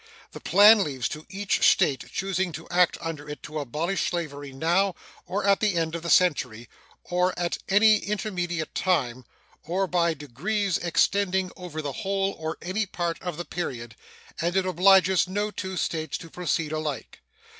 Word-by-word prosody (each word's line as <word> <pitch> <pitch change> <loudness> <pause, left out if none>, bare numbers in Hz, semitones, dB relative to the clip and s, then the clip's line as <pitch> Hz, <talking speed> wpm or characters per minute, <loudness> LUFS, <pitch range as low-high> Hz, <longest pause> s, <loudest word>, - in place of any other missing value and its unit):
The - - -9
plan 210 +1 +6
leaves 130 -6 -2
to 155 0 -8
each 200 +1 -1
State 145 -8 +3
choosing 190 -2 -1
to 160 +2 -8
act 175 0 +3
under 155 -3 -6
it 150 - -8
to 155 0 -5
abolish 155 +8 -2
slavery 145 -5 -5
now 170 +7 +1 0.3
or 195 +2 -2
at 200 -1 +4
the 210 -4 +1
end 165 -1 0
of 170 - -4
the 170 - -5
century, 130 -11 +2 0.4
or 180 +1 0
at 175 -1 -2
any 210 +2 +5
intermediate 180 -6 -3
time, 130 -9 0 0.4
or 180 +5 -1
by 170 -2 +1
degrees 175 - -2
extending 190 +2 +1
over 170 -4 -7
the 140 -2 -3
whole 195 -1 -1
or 160 0 -4
any 200 +4 -1
part 170 -3 -3
of 175 -4 -5
the 175 - -5
period, 120 -10 -5 0.5
and 170 +2 -1
it 190 - +2
obliges 185 0 +4
no 205 +3 -2
two 190 -2 -5
States 160 -2 -2
to 165 -2 -12
proceed 165 -3 -2
alike. 155 -5 -4
175 Hz, 165 wpm, -26 LUFS, 155-190 Hz, 0.5 s, plan